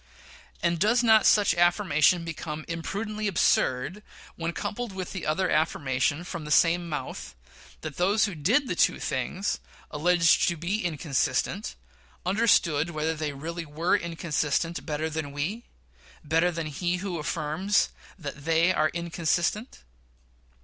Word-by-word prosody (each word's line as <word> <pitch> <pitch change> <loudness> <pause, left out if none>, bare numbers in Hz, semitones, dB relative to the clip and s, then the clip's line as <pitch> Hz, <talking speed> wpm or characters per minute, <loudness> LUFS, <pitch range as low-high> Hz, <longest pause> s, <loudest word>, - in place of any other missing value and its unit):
And 170 -1 +1
does 225 +6 +3
not 220 -2 +6
such 205 -1 +5
affirmation 175 -2 +3
become 155 -1 -5
impudently 210 +6 -3
absurd 170 -2 +1 0.3
when 165 0 -3
coupled 220 +5 -4
with 185 -1 -5
the 190 - -5
other 180 +5 +1
affirmation 145 0 0
from 170 -2 -6
the 150 - -7
same 170 +3 +3
mouth, 105 - -5 0.5
that 155 -3 -7
those 200 +5 +3
who 205 - -4
did 205 - +2
the - - -1
two - - +3
things 200 +3 -2 0.3
alleged 165 +2 +3
to 170 - 0
be 185 +7 -2
inconsistent 150 - -1 0.5
understood 175 -6 +3
whether 160 0 -1
they 155 -2 -3
really 165 +5 -5
were 160 +5 0
inconsistent 165 -2 -1
better 155 +1 -1
than 155 -3 -4
we 180 +12 -3 0.6
better 165 +4 +2
than 165 -1 -4
he 175 +4 -1
who 180 -2 -4
affirms 155 +6 0 0.3
that 140 -4 -8
they 165 +3 +3
are 155 -2 +2
inconsistent? 170 +6 -1
170 Hz, 135 wpm, -27 LUFS, 155-185 Hz, 0.6 s, not